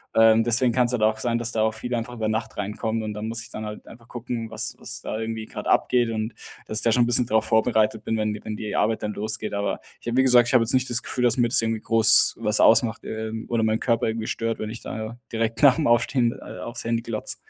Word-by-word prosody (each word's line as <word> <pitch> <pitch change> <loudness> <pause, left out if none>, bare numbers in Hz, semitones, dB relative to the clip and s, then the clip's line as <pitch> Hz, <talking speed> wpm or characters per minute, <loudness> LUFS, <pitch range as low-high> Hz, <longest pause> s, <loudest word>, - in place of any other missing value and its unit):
Ähm, 115 0 +5
deswegen 120 +1 +2
kann's 125 -1 +2
halt 120 - -1
auch 110 0 +2
sein, 115 0 -1
dass 115 0 -2
da 110 - -1
auch 110 0 +1
viel 120 +3 -6
einfach 115 +1 -4
über 110 -2 -3
Nacht 110 0 -3
reinkommt 110 +2 -3
und 105 -1 -4
dann 105 +1 -5
muss 115 0 -3
ich 115 - -11
dann 110 - -7
halt 105 0 -8
einfach 115 0 -15
gucken, 120 -2 -5
was - - -4
was - - -7
da - - -5
irgendwie 110 0 -4
grad - - -7
abgeht 120 -2 +2
und 110 0 -3 0.3
dass 110 - +1
ich - - -2
da 115 - +3
schon 120 +2 +3
'n 120 - 0
bisschen 120 0 +4
darauf 110 -1 +1
vorbereitet 110 -1 +1
bin, 110 - -1
wenn 105 -1 -1
die 105 - -9
wenn 110 - -5
die 105 -1 -5
Arbeit 110 +1 0
dann 105 0 -3
losgeht. 110 0 -4
Aber 100 -1 -2 0.2
ich - - -13
habe 120 - -1
wie 130 - +5
gesagt, 120 -2 +5
ich - - -2
habe 125 -2 +5
jetzt 115 - -2
nicht 130 0 +1
das 120 0 +1
Gefühl, 125 - -3
dass 120 0 +4
mir 120 -1 +3
das 115 - +4
irgendwie 115 -1 -2
groß 115 0 +5
was 105 -1 +1
ausmacht, 115 0 +4
ähm, 110 0 -5
oder 115 -1 0
meinen 110 0 +1
Körper 115 -1 0
irgendwie 110 0 -3
stört, 115 0 -3
wenn 110 - -4
ich 115 - -8
da 110 +1 -6
direkt 115 0 -2
nach 140 -1 +7
'm 150 - +1
Aufstehen, 120 0 +2
äh, - - -10
aufs 120 +1 -6
Handy 115 0 0
glotze. 115 -2 -4
115 Hz, 275 wpm, -24 LUFS, 110-120 Hz, 0.3 s, nach